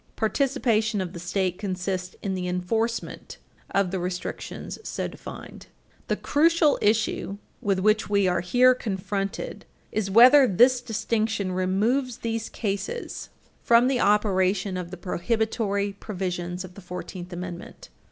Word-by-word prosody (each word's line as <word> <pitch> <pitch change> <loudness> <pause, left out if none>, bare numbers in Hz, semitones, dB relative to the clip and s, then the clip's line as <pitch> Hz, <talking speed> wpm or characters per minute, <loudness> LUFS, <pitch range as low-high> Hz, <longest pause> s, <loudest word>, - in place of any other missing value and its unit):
Participation 225 -3 +1
of 185 -1 -3
the 170 - -7
State 185 +1 -1
consists 185 -2 -3
in 195 - -1
the 180 -1 -3
enforcement 220 +6 -2 0.3
of 195 -2 +1
the 190 - -1
restrictions 180 0 -5
so - - -3
defined. - - -10 0.4
The - - +1
crucial 320 0 +3
issue 210 -2 +1 0.2
with 200 -5 +1
which 215 +3 +2
we 200 -2 +3
are 180 -1 +1
here 250 +8 +5
confronted 195 -3 -4 0.3
is 215 -3 -1
whether 255 +6 +8
this 245 +6 +4
distinction 220 -3 -1
removes 220 +8 0
these 225 -2 -3
cases 220 - -4 0.3
from 235 +1 +5
the 260 -2 +1
operation 195 -2 +2
of 180 -2 -4
the 185 - -8
prohibitory 200 +2 -1
provisions 180 -3 -4
of 185 - -12
the 200 - -12
Fourteenth 180 0 -7
Amendment. 175 0 -8
200 Hz, 130 wpm, -25 LUFS, 185-230 Hz, 0.4 s, whether